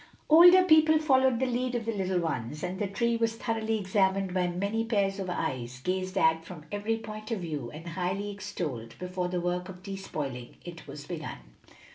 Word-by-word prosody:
Older 355 Hz, +4 st, +9 dB
people 315 Hz, -2 st, +6 dB
followed 265 Hz, -5 st, +3 dB
the 260 Hz, -, +2 dB
lead 250 Hz, 0 st, -1 dB
of 235 Hz, -2 st, -2 dB
the 230 Hz, -, 0 dB
little 190 Hz, -3 st, 0 dB
ones, 150 Hz, -4 st, -3 dB
and 185 Hz, +1 st, -3 dB
the 205 Hz, -, 0 dB
tree 235 Hz, +4 st, 0 dB
was 225 Hz, -1 st, 0 dB
thoroughly 225 Hz, -1 st, -1 dB
examined 190 Hz, -1 st, +1 dB
by 180 Hz, -1 st, +1 dB
many 200 Hz, +6 st, -1 dB
pairs 200 Hz, -4 st, 0 dB
of 190 Hz, -2 st, -3 dB
eyes, 125 Hz, -7 st, -3 dB
gazed 185 Hz, +1 st, -2 dB
at 160 Hz, -3 st, +3 dB
from 165 Hz, -3 st, -10 dB
every 210 Hz, +2 st, -1 dB
point 215 Hz, -1 st, -8 dB
of 225 Hz, -5 st, -2 dB
view, 150 Hz, -8 st, -4 dB
and 160 Hz, +5 st, -8 dB
highly 190 Hz, +4 st, -2 dB
extolled, 140 Hz, -, -5 dB
before 180 Hz, 0 st, -3 dB
the 180 Hz, 0 st, -2 dB
work 180 Hz, +1 st, -2 dB
of 185 Hz, -1 st, -10 dB
despoiling 150 Hz, -11 st, -5 dB
it 170 Hz, -1 st, -9 dB
was 145 Hz, 0 st, -8 dB
begun. 155 Hz, -1 st, -5 dB
190 Hz, 190 wpm, -29 LUFS, 175-225 Hz, -, Older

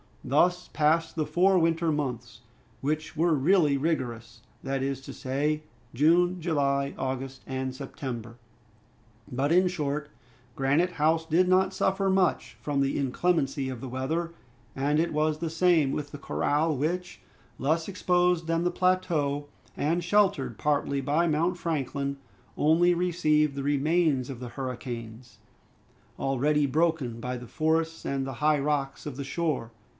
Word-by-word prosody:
Thus 180 Hz, +7 st, +2 dB
passed 160 Hz, +2 st, +2 dB
the 155 Hz, -2 st, 0 dB
four 185 Hz, +4 st, +3 dB
winter 165 Hz, -1 st, +2 dB
months, 125 Hz, -6 st, -4 dB, 0.4 s
which 155 Hz, +3 st, -2 dB
were 165 Hz, +1 st, +3 dB
really 150 Hz, 0 st, +3 dB
rigorous, 130 Hz, -7 st, -3 dB, 0.2 s
that 135 Hz, 0 st, -2 dB
is 135 Hz, -1 st, -2 dB
to -, -, -9 dB
say, 150 Hz, +4 st, -1 dB, 0.3 s
June, 175 Hz, +6 st, +3 dB
July, 140 Hz, -4 st, 0 dB
August, 130 Hz, 0 st, -4 dB
and 130 Hz, 0 st, -3 dB
September. 120 Hz, -4 st, -6 dB, 0.9 s
But, 135 Hz, +4 st, 0 dB
in 180 Hz, +2 st, +5 dB
short, 150 Hz, -4 st, -2 dB, 0.5 s
Granite 145 Hz, +7 st, +1 dB
House 160 Hz, +1 st, +2 dB
did 170 Hz, +3 st, +3 dB
not 185 Hz, +1 st, +3 dB
suffer 190 Hz, +1 st, +1 dB
much 180 Hz, -10 st, +1 dB
from 140 Hz, 0 st, 0 dB
the 135 Hz, 0 st, 0 dB
inclemency 140 Hz, 0 st, 0 dB
of 125 Hz, -3 st, -6 dB
the 130 Hz, -, -6 dB
weather, 155 Hz, +7 st, -2 dB, 0.4 s
and 145 Hz, +3 st, +1 dB
it 165 Hz, 0 st, 0 dB
was 155 Hz, 0 st, +1 dB
the 165 Hz, 0 st, -2 dB
same 165 Hz, -4 st, +3 dB
with 145 Hz, -1 st, -4 dB
the -, -, -7 dB
corral, 150 Hz, +2 st, 0 dB
which, 175 Hz, +6 st, -3 dB, 0.4 s
less 160 Hz, +4 st, 0 dB
exposed 180 Hz, -3 st, +1 dB
than 165 Hz, +1 st, +1 dB
the 175 Hz, -, +1 dB
plateau, 165 Hz, -6 st, 0 dB, 0.3 s
and 165 Hz, +4 st, 0 dB
sheltered 200 Hz, +2 st, +2 dB
partly 145 Hz, -2 st, 0 dB
by 150 Hz, +6 st, +1 dB
Mount 165 Hz, +3 st, +1 dB
Franklin, 140 Hz, -4 st, -2 dB, 0.4 s
only 170 Hz, +4 st, +4 dB
received 155 Hz, -4 st, +2 dB
the 140 Hz, -, -3 dB
remains 145 Hz, -1 st, +1 dB
of 125 Hz, -, -8 dB
the 125 Hz, -1 st, -6 dB
hurricanes, 120 Hz, -3 st, -7 dB, 0.8 s
already 145 Hz, +3 st, +1 dB
broken 150 Hz, -5 st, 0 dB
by 125 Hz, +1 st, -3 dB
the 120 Hz, 0 st, -9 dB
forests 160 Hz, +3 st, 0 dB
and 135 Hz, -1 st, -1 dB
the 135 Hz, -, -5 dB
high 150 Hz, +4 st, +2 dB
rocks 140 Hz, -1 st, -1 dB
of 145 Hz, -, -5 dB
the 140 Hz, -, -3 dB
shore. 140 Hz, -5 st, -2 dB
150 Hz, 145 wpm, -27 LUFS, 135-170 Hz, 0.9 s, in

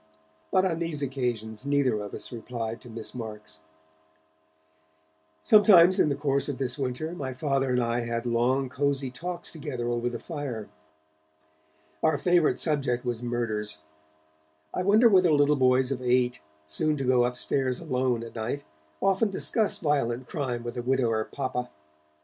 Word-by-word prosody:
But 185 Hz, 0 st, +3 dB
on 165 Hz, -3 st, 0 dB
these 165 Hz, -4 st, -1 dB
occasions 120 Hz, -5 st, -3 dB
neither 140 Hz, -6 st, +1 dB
of 105 Hz, -1 st, -6 dB
us -, -, -6 dB
replied 115 Hz, -1 st, -5 dB
to 120 Hz, -, -12 dB
Miss 115 Hz, -1 st, -7 dB
Marks. 105 Hz, -9 st, -7 dB, 1.8 s
Sometimes 190 Hz, -, +7 dB
in -, -, +4 dB
the 140 Hz, -, 0 dB
course 140 Hz, 0 st, 0 dB
of 140 Hz, -, -3 dB
this 130 Hz, -1 st, 0 dB
winter, 135 Hz, +4 st, -2 dB
my 135 Hz, -7 st, -5 dB
Father 135 Hz, 0 st, 0 dB
and 125 Hz, -1 st, +2 dB
I 115 Hz, +1 st, 0 dB
had 115 Hz, 0 st, -3 dB
long 125 Hz, +3 st, +1 dB
cosy 140 Hz, 0 st, -1 dB
talks 175 Hz, +6 st, -5 dB
together 140 Hz, -7 st, -5 dB
over 120 Hz, 0 st, -1 dB
the 120 Hz, -, -5 dB
fire. 140 Hz, -, -5 dB, 1.3 s
Our 155 Hz, -2 st, +3 dB
favourite 175 Hz, 0 st, +2 dB
subject 135 Hz, -6 st, 0 dB
was 120 Hz, -2 st, -2 dB
murders. 115 Hz, -5 st, -2 dB, 1.0 s
I -, -, -1 dB
wonder 210 Hz, +5 st, +5 dB
whether 185 Hz, -5 st, +5 dB
little 145 Hz, 0 st, +4 dB
boys 130 Hz, 0 st, +3 dB
of 130 Hz, -2 st, -2 dB
eight, 125 Hz, 0 st, +1 dB, 0.3 s
soon 150 Hz, -, 0 dB
to 135 Hz, -, -2 dB
go 125 Hz, -1 st, +3 dB
upstairs 125 Hz, +1 st, -1 dB
alone 130 Hz, -6 st, -1 dB
at 115 Hz, -, -9 dB
night, 120 Hz, +5 st, -3 dB, 0.4 s
often 195 Hz, +3 st, +3 dB
discuss 210 Hz, +2 st, 0 dB
violent 130 Hz, -6 st, 0 dB
crime 125 Hz, -6 st, -3 dB
with 120 Hz, +1 st, -6 dB
a -, -, -1 dB
widower 120 Hz, -3 st, +1 dB
papa? 130 Hz, -3 st, -4 dB
130 Hz, 155 wpm, -27 LUFS, 120-145 Hz, 1.8 s, Sometimes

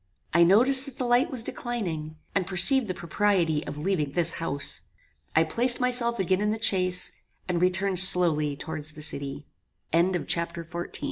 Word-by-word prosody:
I 170 Hz, -, +3 dB
noticed 255 Hz, +9 st, +5 dB
that 275 Hz, -2 st, -11 dB
the 255 Hz, -, -3 dB
light 245 Hz, +6 st, +2 dB
was 250 Hz, -5 st, -1 dB
declining, 175 Hz, -13 st, -5 dB, 0.2 s
and 195 Hz, -3 st, -1 dB
perceived 215 Hz, +7 st, +5 dB
the 185 Hz, -, -4 dB
propriety 170 Hz, -2 st, -1 dB
of -, -, -7 dB
leaving 150 Hz, -3 st, -2 dB
this 170 Hz, 0 st, 0 dB
house. 140 Hz, -3 st, -2 dB, 0.5 s
I 160 Hz, -, +4 dB
placed 240 Hz, +10 st, +4 dB
myself 245 Hz, -2 st, +1 dB
again 190 Hz, +1 st, 0 dB
in 210 Hz, -, 0 dB
the 220 Hz, +1 st, -3 dB
chaise, 185 Hz, -5 st, +2 dB, 0.4 s
and 175 Hz, -1 st, -2 dB
returned 185 Hz, +1 st, 0 dB
slowly 165 Hz, -6 st, +3 dB
towards 155 Hz, 0 st, -7 dB
the 155 Hz, 0 st, -6 dB
city. 140 Hz, -1 st, -5 dB, 0.5 s
Chapter 170 Hz, -1 st, -1 dB
XV 165 Hz, -, -20 dB
Befo 175 Hz, 0 st, -5 dB
180 Hz, 165 wpm, -25 LUFS, 160-220 Hz, 0.5 s, noticed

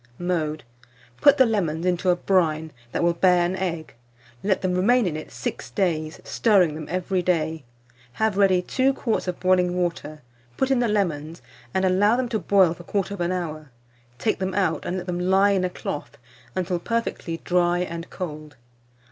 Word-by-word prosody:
Mode. 160 Hz, -4 st, -2 dB, 0.5 s
Put 285 Hz, 0 st, +6 dB
the 260 Hz, -, +6 dB
lemons 175 Hz, -7 st, -1 dB
into 180 Hz, +1 st, +1 dB
a 180 Hz, -, +5 dB
brine 160 Hz, -4 st, +1 dB, 0.2 s
that -, -, -1 dB
will 170 Hz, 0 st, +3 dB
bear 180 Hz, 0 st, +3 dB
an 180 Hz, +2 st, -1 dB
egg; 170 Hz, -4 st, -4 dB, 0.5 s
let 195 Hz, -2 st, 0 dB
them 185 Hz, -1 st, +1 dB
remain 225 Hz, +6 st, +3 dB
in 170 Hz, -4 st, -1 dB
it 155 Hz, -, -7 dB
6 120 Hz, +1 st, -5 dB
days, 155 Hz, +1 st, -1 dB
stirring 195 Hz, -8 st, +3 dB
them 155 Hz, 0 st, -7 dB
every 185 Hz, +1 st, -1 dB
day; 160 Hz, -3 st, 0 dB, 0.5 s
have 220 Hz, +4 st, 0 dB
ready 190 Hz, -2 st, +3 dB
2 265 Hz, +6 st, +1 dB
quarts 225 Hz, -7 st, -1 dB
of 180 Hz, -, -3 dB
boiling 180 Hz, -1 st, +2 dB
water, 165 Hz, -4 st, -3 dB, 0.3 s
put 265 Hz, 0 st, +1 dB
in 265 Hz, -, +3 dB
the 240 Hz, -, +2 dB
lemons, 165 Hz, -6 st, -1 dB, 0.3 s
and 190 Hz, 0 st, +1 dB
allow 200 Hz, +4 st, +4 dB
them 250 Hz, -1 st, -1 dB
to 220 Hz, -3 st, -1 dB
boil 190 Hz, -2 st, +4 dB
for 175 Hz, -, -12 dB
1/4 195 Hz, -1 st, -2 dB
hour; 155 Hz, -5 st, -4 dB, 0.5 s
take 215 Hz, -, 0 dB
them 190 Hz, -1 st, -2 dB
out, 185 Hz, -5 st, 0 dB
and 180 Hz, -, -2 dB
let 180 Hz, -, -5 dB
them 175 Hz, -1 st, -3 dB
lie 190 Hz, +3 st, +3 dB
in 190 Hz, -2 st, +1 dB
a 185 Hz, -, 0 dB
cloth 150 Hz, -4 st, -6 dB, 0.4 s
until 180 Hz, -1 st, -1 dB
perfectly 230 Hz, -5 st, -2 dB
dry 175 Hz, -1 st, +2 dB
and 170 Hz, -1 st, -4 dB
cold. 155 Hz, -5 st, -7 dB
180 Hz, 180 wpm, -24 LUFS, 165-195 Hz, 0.5 s, Put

